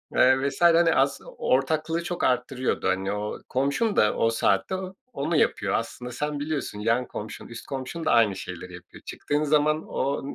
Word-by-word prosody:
eee, 130 +2 +4
vs. - - -10
hani, 170 -1 +6
aslı 135 +1 +1
ortaklığı 155 +5 0
çok 175 0 -4
arttırıyordu. 125 -1 0
Hani, 95 +1 0
o 105 +1 -3
komşun 140 - 0
da 105 - +3
o 115 - +3
saatte 115 - +1
o 185 0 -6 0.2
onu 155 +4 -1
yapıyor 100 -8 +1
aslında 125 +2 -3
sen 150 +4 -3
biliyorsun. 145 -8 -3
Yan 115 +4 +1
komşun 105 0 -7
üst 120 -1 -9
komşun 140 +5 -5
da - - +2
aynı 110 -5 +4
şeyleri 90 -1 -8
yapıyor. 90 -1 -13
Çıktığın 145 +1 -2
zaman 150 +1 +2
o 140 +1 -1
135 Hz, 175 wpm, -26 LUFS, 115-155 Hz, 0.2 s, hani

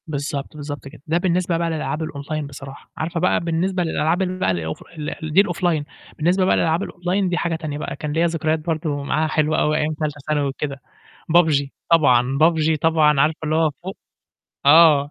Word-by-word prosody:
بالضبط، 145 -1 -4
بالضبط 145 -3 -7
كده. 135 - -13
ده 160 +2 +1
بالنسبة 175 -1 0
بقى 170 0 -1
للألعاب 160 0 -3
الأونلاين 150 0 -5
بصراحة، 140 0 -11
عارفة 165 +1 -2
بقى 180 - +2
بالنسبة 175 +2 -1
للألعاب 165 +2 0
ال 185 0 -2
بقى 95 - +2
الأوف 80 -3 -4
ل 155 +1 -5
دي 190 - +7
الأوفلاين، 175 -5 -1 0.3
بالنسبة 180 +4 +2
بقى - - +3
للألعاب 165 +3 +1
الأونلاين 180 +1 -1
دي 175 - -1
حاجة 170 -1 -1
تانية 155 -3 -5
بقى، 140 -2 -5
كان 150 0 -5
ليّا 165 +2 +2
ذكريات 160 -1 -1
برضه 155 -3 -2
معاها 155 +2 0
حلوة 155 0 +1
أوي 155 0 +1
أيام 155 0 0
تالتة 150 -1 -4
ثانوي 150 -2 +1
وكده، 140 0 -5 0.6
PUBG، 150 -5 +3 0.2
طبعًا، 135 -5 +4
PUBG 160 0 +3
طبعًا 155 -3 +3
عارفة 155 +2 +1
اللي 155 0 0
هو 160 -1 +3
فوق 190 +2 -6 0.7
آه، 145 -2 +6
155 Hz, 185 wpm, -21 LUFS, 145-170 Hz, 0.7 s, دي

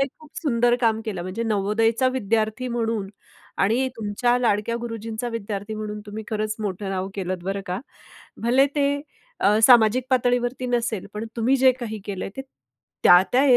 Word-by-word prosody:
हे 275 - +3
खूप 310 -2 -16
सुंदर 240 -5 +2
काम 225 -2 +2
केलं. 195 -5 -4
म्हणजे 185 +6 -4
नवोदयचा 225 +3 +1
विद्यार्थी 220 +1 0
म्हणून 225 -4 -2 0.6
आणि 250 +6 +2
तुमच्या 225 +3 +1
लाडक्या 230 -1 +1
गुरुजींचा 230 0 -4
विद्यार्थी 215 -2 -4
म्हणून 210 -1 -5
तुम्ही 215 +1 -7
खरंच 215 0 -1
मोठं 200 -1 -3
नाव 190 0 -2
केलंत, 185 -2 -3
बरं 195 +1 -2
का. 180 +2 -3 0.6
भले 255 +4 +4
ते 280 - +3 0.5
अ, 210 +2 +4
सामाजिक 240 0 +6
पातळीवरती 245 0 +1
नसेल, 235 -5 -1
पण 210 +2 -4
तुम्ही 245 +4 +3
जे 260 -1 +6
काही 235 -4 -6
केलंय, 195 -2 -4
ते 270 - -4 0.6
त्या-त्या 190 +9 +6
225 Hz, 155 wpm, -23 LUFS, 205-245 Hz, 0.6 s, सामाजिक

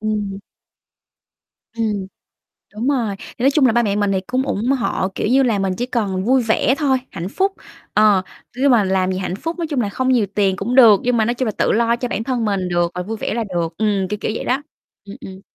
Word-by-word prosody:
Ừm. 210 -2 -2 1.4
Ừm, 210 -4 -1 0.7
đúng 220 +4 -3
rồi, 240 -8 0
thì - - -12
nói 275 - +5
chung 285 -1 +3
là 245 - +5
ba 240 +1 +2
mẹ 205 -2 0
mình 205 -1 +1
thì 190 - +1
cũng 255 +1 0
ủng 235 -3 -2
hộ, 255 -7 0
kiểu - - -1
như 265 +3 +4
là, 225 -6 +1
mình 195 -1 0
chỉ 245 - -1
cần 205 -7 -2
vui 255 +3 +3
vẻ 225 +3 +2
thôi, 275 -4 +2
hạnh 175 +3 -5
phúc, 390 - 0 0.4
ờ, 210 -3 +4 0.4
nhưng 275 +1 +3
mà 230 -4 +4
làm 190 -1 +1
gì 185 - -2
hạnh 185 -1 -3
phúc 330 - -5
nói 335 - -2
chung 290 -5 -1
là 205 - -1
không 260 +5 -1
nhiều 240 -5 +3
tiền 195 -2 +2
cũng 245 +5 -2
được, 225 -6 +8
nhưng 245 -1 +1
mà 220 - +2
nói 240 - 0
chung 255 +1 -2
là 220 - 0
tự - - +2
lo 235 +1 +2
cho 245 +1 -3
bản 220 -2 -3
thân 240 -2 -1
mình 195 -3 -1
được, 175 0 0
rồi 180 - -3
vui 220 +4 -5
vẻ - - -3
là 235 - -1
được. 175 -5 -3
Ừm, 205 -3 0
kiểu, 210 - -3
kiểu - - -1
vậy - - -4
đó. 265 +3 0 0.4
Ừm, 200 - -9
ừm. 190 -4 -10
220 Hz, 250 wpm, -19 LUFS, 195-250 Hz, 1.4 s, được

